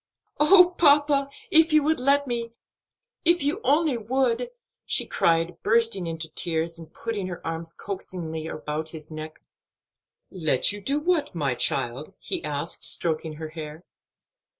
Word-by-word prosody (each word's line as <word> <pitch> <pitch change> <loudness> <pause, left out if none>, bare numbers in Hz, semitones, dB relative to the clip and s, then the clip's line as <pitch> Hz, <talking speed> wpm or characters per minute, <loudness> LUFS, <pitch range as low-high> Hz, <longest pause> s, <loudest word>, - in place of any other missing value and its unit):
"Oh, 360 +3 +6
papa, 285 -2 +4 0.2
if 320 0 +6
you 305 -1 +4
would 315 0 +1
let 280 +2 +2
me! 235 -2 -4 0.7
if 340 -2 +3
you 310 +10 -1
only 295 -2 +2
would!" 255 - 0 0.3
she - - +2
cried, 165 +1 0
bursting 225 -4 +2
into 165 0 -4
tears, 165 0 -1
and 160 -1 -12
putting 215 -5 -4
her 180 -2 -6
arms 165 0 -4
coaxingly 170 -5 -5
about 155 0 -4
his 155 0 -10
neck. 155 0 -8 0.9
"Let 160 -7 0
you 205 0 -7
do 275 +8 -1
what, 305 - 0
my 140 -5 0
child?" 120 +3 -2
he - - -4
asked, 150 +2 -3
stroking 160 -1 +2
her 155 +1 -7
hair. 155 0 -8
185 Hz, 145 wpm, -25 LUFS, -, 0.9 s, Oh